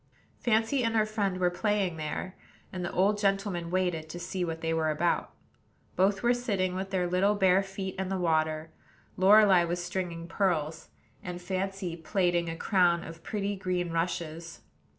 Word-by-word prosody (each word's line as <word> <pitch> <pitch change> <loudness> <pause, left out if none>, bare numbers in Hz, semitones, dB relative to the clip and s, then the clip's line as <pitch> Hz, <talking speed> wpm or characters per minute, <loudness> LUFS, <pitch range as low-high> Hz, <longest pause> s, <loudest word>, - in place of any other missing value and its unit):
Fancy 230 +3 +2
and 230 0 0
her 215 -1 +4
friend 205 -3 -1
were 180 -1 +2
playing 195 -2 0
there, 155 +4 -4 0.4
and 180 -1 -4
the 175 - -3
old 205 +3 +2
gentleman 195 -4 0
waited 175 -3 -1
to 175 - -6
see 185 +1 -3
what 165 -1 -4
they 165 0 0
were 160 -1 +1
about. 160 +3 0 0.7
Both 195 +3 +2
were 240 +1 +4
sitting 200 -7 -1
with 190 +1 -4
their 185 -2 0
little 185 +4 +2
bare 190 -1 +4
feet 195 -1 -5
in 190 -1 -2
the 195 - -1
water; 160 -2 0 0.4
Lorelei 195 -1 +6
was 175 +1 -2
stringing 175 -2 -4
pearls, 165 -5 -1 0.3
and 180 -1 -6
Fancy 190 -1 -3
plaiting 175 0 0
a 165 - -5
crown 175 -3 +2
of 165 0 -10
pretty 205 0 -2
green 180 -2 -2
rushes. 165 0 -3
185 Hz, 170 wpm, -29 LUFS, 170-195 Hz, 0.7 s, Lorelei